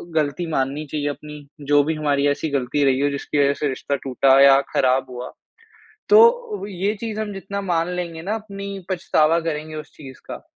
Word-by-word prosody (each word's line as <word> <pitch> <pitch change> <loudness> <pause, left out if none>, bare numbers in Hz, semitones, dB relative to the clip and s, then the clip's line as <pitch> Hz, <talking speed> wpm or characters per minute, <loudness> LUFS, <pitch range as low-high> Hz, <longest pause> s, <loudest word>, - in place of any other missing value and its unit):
गलती 155 +3 0
माननी 140 +2 -1
चाहिए 145 -1 -2
अपनी, 150 0 -9
जो 145 0 +3
भी 160 +2 -1
हमारी 145 -2 +1
ऐसी 145 +2 -1
गलती 140 +1 0
रही 135 0 +2
हो 145 - +2
जिसकी 140 +1 -3
वज़ह 140 0 +4
से 150 - 0
रिश्ता 140 +2 -3
टूटा 135 0 +3
या 140 0 +7
ख़राब 130 0 +2
हुआ। 125 0 -7 0.8
तो 460 - +4
ये 200 +3 -2
चीज़ 220 -2 -4
हम 210 -1 -4
जितना 200 +1 -5
मान 170 -2 0
लेंगे 165 -2 -5
ना 205 +4 -2
अपनी 200 -2 -7 0.2
पछतावा 165 -3 +2
करेंगे 155 -1 -4
उस 150 -1 -9
चीज़ 135 -3 -11
का, - - -7
150 Hz, 190 wpm, -21 LUFS, 140-185 Hz, 0.8 s, या